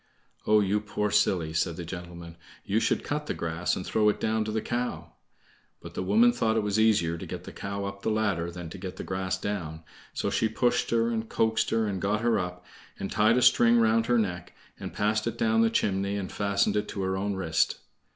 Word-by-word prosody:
"Oh, 105 0 +5
you 100 +1 +1
poor 105 0 -2
silly!" 80 -6 +2
said 80 +1 0
the 85 -1 -6
gentleman, 85 -1 -8 0.3
"you 105 +3 +1
should 115 - 0
cut 150 +1 -3
the - - -2
grass 85 +1 -1
and 90 - -5
throw 105 -1 +2
it 105 - -1
down 110 0 0
to 110 - -3
the 110 - 0
cow!" 120 +3 -3 0.7
But - - -11
the - - -3
woman 110 +6 +4
thought 115 -2 +1
it 110 - +1
was 105 +1 0
easier 85 -7 +2
to - - -6
get - - -6
the - - -9
cow 100 0 -5
up 100 0 -6
the - - -1
ladder 105 -6 0
than 85 0 -7
to 95 - -8
get 95 -1 -6
the - - -6
grass 95 0 -2
down, 85 -6 -4 0.3
so - - -2
she 110 - +1
pushed 120 +2 +1
her 115 0 +2
and 115 -1 -3
coaxed 110 0 +1
her 115 -1 +1
and 95 -3 -3
got 105 +2 0
her 115 -2 +2
up, 90 -1 -5 0.3
and 95 - -5
tied 110 +3 +3
a 125 - +3
string 120 0 +5
round 115 0 +3
her 120 - +3
neck, 90 -5 -2 0.3
and - - -6
passed 105 +1 0
it - - -3
down 230 -1 +2
the 230 - +4
chimney, 100 - 0
and 95 -2 -4
fastened 100 0 +1
it 105 - 0
to 100 - -4
her 95 0 -1
own 100 +1 -2
wrist. 80 -4 +1
100 Hz, 230 wpm, -27 LUFS, 90-110 Hz, 0.7 s, Oh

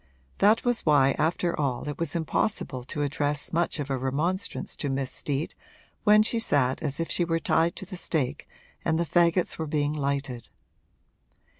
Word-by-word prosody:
That 215 +4 +4
was 245 -1 +2
why 140 -3 +5
after 170 +2 +1
all 135 -2 -1
it 145 - -5
was 165 -2 -2
impossible 160 - -1
to 145 +2 -3
address 145 +1 0
much 170 -1 0
of 140 -1 -3
a 135 - 0
remonstrance 155 +9 -2
to 145 - -2
Miss 135 -1 -2
Steet 145 +2 -2 0.5
when 210 0 +7
she 230 +1 0
sat 135 - +2
as 145 -1 -2
if 165 - -2
she 175 - +1
were 165 -1 0
tied 165 +1 +2
to - - -7
the 185 0 -8
stake 155 -7 -2 0.3
and 160 - +1
the 170 - 0
fagots 170 +2 +2
were 160 - -2
being 145 0 0
lighted. 140 -5 -3
155 Hz, 175 wpm, -27 LUFS, 140-170 Hz, 0.5 s, when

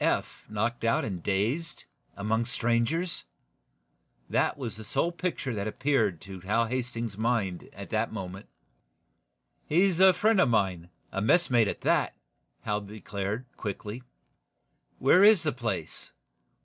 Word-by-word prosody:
Eph - - -1
knocked 110 +3 -1
out 115 - +2
and 95 -5 -4
dazed 115 - -1 0.3
among 110 +3 0
strangers! 120 - 0 1.1
That - - +2
was 120 -6 -4
the 110 - -8
sole 165 +10 0
picture 170 -7 -3
that 100 -1 -2
appeared 110 - +1
to 95 -1 -9
Hal 105 +6 +1
Hastings's 115 -3 -3
mind 110 -6 -1
at - - -10
that - - 0
moment. 95 +2 -6 1.2
"He's 180 +2 +3
a 190 0 +8
friend 215 -2 +4
of 135 - +4
mine 95 -6 0 0.2
messmate, 115 - +3
at - - -3
that," - - +2 0.5
Hal 105 0 -1
declared, 100 +2 -4
quickly. 105 +3 -5 1.0
"Where 170 +8 +5
is 210 -4 +7
the 155 - +1
place? 115 -10 -3
115 Hz, 130 wpm, -28 LUFS, 100-135 Hz, 1.2 s, a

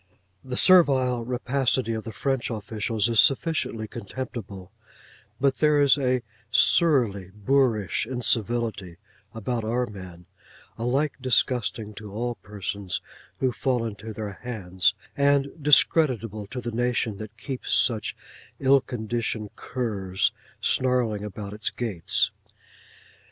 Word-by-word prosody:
The 125 -1 -5
servile 130 -9 +4
rapacity 125 0 0
of 110 -1 -4
the 115 - -5
French 135 -1 -1
officials 110 0 -2
is 115 -2 +2
sufficiently 135 -6 +2
contemptible; 100 -4 -7 0.7
but 135 0 +1
there 150 -1 +4
is 140 -2 +6
a 130 -3 0 0.3
surly 120 - +3
boorish 115 -2 +1
incivility 115 -6 -1 0.4
about 115 +1 -2
our 120 +3 0
men, 95 -5 -10 0.5
alike 135 +6 0
disgusting 120 -4 +1
to 105 0 -9
all 120 +4 -2
persons 100 -2 -5 0.4
who 130 -1 +2
fall 125 -1 -1
into 110 0 -6
their 105 -2 -6
hands, 95 -7 0 0.2
and 140 0 +3
discreditable 125 -7 +3
to 125 +4 -6
the 120 - -4
nation 120 -2 0
that 110 +1 -9
keeps 130 +3 -5
such 110 -4 +2 0.4
ill 135 0 +4
conditioned 115 -3 -4
curs 100 -7 -1 0.3
snarling 125 -5 +1
about 105 0 -6
its 105 - -2
gates. 105 -9 -1
115 Hz, 115 wpm, -25 LUFS, 105-130 Hz, 0.7 s, is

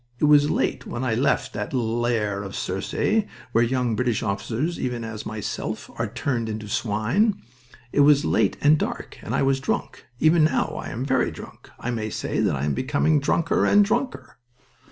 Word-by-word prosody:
It 150 - +2
was 145 0 +5
late - - -1
when 120 +2 -4
I 120 -3 0
left 125 +5 +1
that 155 - -4
lair 115 -4 0
of 100 -1 -7
Circe, 150 - 0 0.3
where 115 0 +4
young 125 -1 0
British 120 -1 0
officers, 110 - -2
even 125 -2 -2
as 110 -2 -6
myself, 110 -1 -5
are - - -2
turned 120 -5 -2
into 110 -1 -5
swine. 115 - +1 0.5
It - - 0
was 145 0 +5
late 105 -3 +2
and 150 +1 +5
dark, - - -4
and - - -3
I - - +2
was 135 0 +2
drunk. 135 - -3
Even 160 +1 +5
now 145 -4 +1
I - - -7
am 125 +4 -4
very 130 -2 +2
drunk. - - -11
I 125 - -3
may 110 -2 -3
say - - -3
that - - +2
I 70 +1 -2
am 75 - 0
becoming 145 - +1
drunker 170 +9 +1
and 205 0 +5
drunker." 245 +5 -3
125 Hz, 185 wpm, -24 LUFS, 110-150 Hz, 0.5 s, was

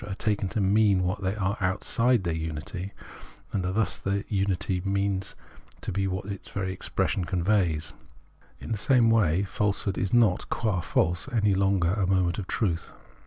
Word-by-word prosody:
are 95 - -4
taken 105 -1 -1
to 110 - -2
mean 100 -1 +3
what 90 +3 -1
they 95 +1 -1
are 100 -1 -1
outside 115 +5 +2
their 85 -2 -1
unity, 80 +4 -4 0.6
and 95 - 0
are 90 - -1
thus 105 -1 -1
in 100 - -1
that 100 - -4
miity 95 -2 0
not 95 - -1
meant 100 -1 -1 0.4
to - - -4
be 95 +1 0
what 95 0 -3
its 100 -1 -7
very 95 -1 -3
expression 95 +1 -1
conveys. 85 -4 0 0.7
In - - -8
the 110 - -1
same 120 -1 +4
way 95 -5 +3
falsehood 100 0 -1
is 95 - -1
not, 115 -6 +3
qua 105 -6 0
false, 85 - 0
any 105 -4 +2
longer 95 -2 +2
a 100 -3 0
moment 90 -1 +1
of 95 - -5
truth. 90 -8 -1
95 Hz, 180 wpm, -27 LUFS, 90-105 Hz, 0.7 s, same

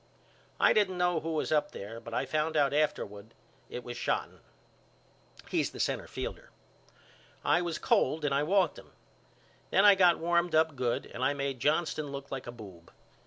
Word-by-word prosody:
I - - +5
didn't 195 -4 +2
know 180 -2 +2
who 160 +1 -4
was 155 - -1
up 150 -1 +1
there 110 +3 -7
but 115 0 -10
I - - -1
found 155 +1 -1
out 140 -1 +3
afterward 110 -8 -2 0.3
it 125 - -6
was 120 - -7
Shotten. - - -2 1.1
He's - - +1
the - - -12
centerfielder. - - -3 1.0
I 175 - +3
was 170 -2 -2
cold 155 -1 +1
and 140 - +1
I 140 - +2
walked 190 +5 +2
him. - - -17 0.8
Then 195 - +4
I 205 - +9
got 180 -3 +5
warmed 170 0 +1
up 160 -1 +3
good 125 -2 -1
and 125 - -6
I 140 +2 +2
made 140 -2 -3
Johnston 155 +2 0
look 140 0 -7
like 135 -2 -5
a - - -4
boob. 95 -8 -13
150 Hz, 175 wpm, -30 LUFS, 125-170 Hz, 1.1 s, I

